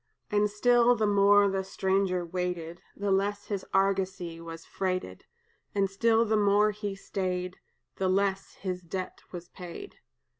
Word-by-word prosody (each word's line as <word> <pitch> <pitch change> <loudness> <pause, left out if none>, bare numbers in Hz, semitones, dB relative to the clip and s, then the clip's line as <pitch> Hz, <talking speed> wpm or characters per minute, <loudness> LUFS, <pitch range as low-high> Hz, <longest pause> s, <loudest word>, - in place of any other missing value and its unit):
"And 210 0 +3
still, 240 +3 +4
the 220 - +1
more 205 0 +5
the 195 -1 -1
stranger 190 -1 0
waited, 175 -1 -4 0.2
The 200 0 -1
less 200 +1 0
his 200 -3 -2
argosy 190 -3 0
was 165 0 -9
freighted; 185 - -3 0.5
And 195 -1 +1
still 225 +3 +3
the 220 0 +1
more 210 0 +4
he 205 -1 -5
stayed, 185 -2 -3 0.4
The 190 -1 0
less 195 0 0
his 185 -2 -4
debt 180 +2 -6
was 175 -1 -8
paid. 180 - -9
195 Hz, 145 wpm, -29 LUFS, 180-205 Hz, 0.5 s, more